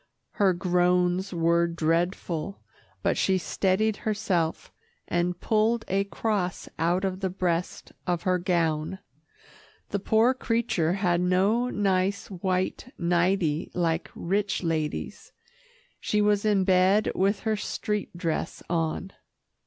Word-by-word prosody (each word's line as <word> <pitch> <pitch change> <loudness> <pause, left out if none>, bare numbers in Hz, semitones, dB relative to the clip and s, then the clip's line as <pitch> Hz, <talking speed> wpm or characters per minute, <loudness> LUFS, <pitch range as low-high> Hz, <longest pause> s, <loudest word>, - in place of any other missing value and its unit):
Her 200 -2 +3
groans 180 +1 +1
were 170 0 +2
dreadful, 170 +2 -1 0.5
but - - +1
she 190 -1 +3
steadied 195 +3 0
herself, 200 -7 -1 0.4
and 175 0 0
pulled 225 +1 +1
a 195 +1 +1
cross 200 -3 -2
out 175 +4 +1
of 185 -1 -2
the 190 -1 -1
breast 180 -2 -2 0.2
of 175 -2 0
her 185 -1 +2
gown 170 -1 0 0.9
the 200 - -1
poor 220 +5 +3
creature 230 -10 0
had 180 -3 +1
no 195 +7 +2
nice 195 -2 0
white 185 +6 -2
nightie 170 -2 +1
like 165 -1 0
rich 195 +2 -1
ladies. 160 -2 -3 0.7
She 210 - 0
was 210 0 +2
in 205 -3 +3
bed 190 +3 +3
with 195 +2 +1
her 220 -1 0
street 210 -2 -3
dress 165 -3 -3
on. 165 +3 -1
185 Hz, 120 wpm, -27 LUFS, 175-200 Hz, 0.9 s, Her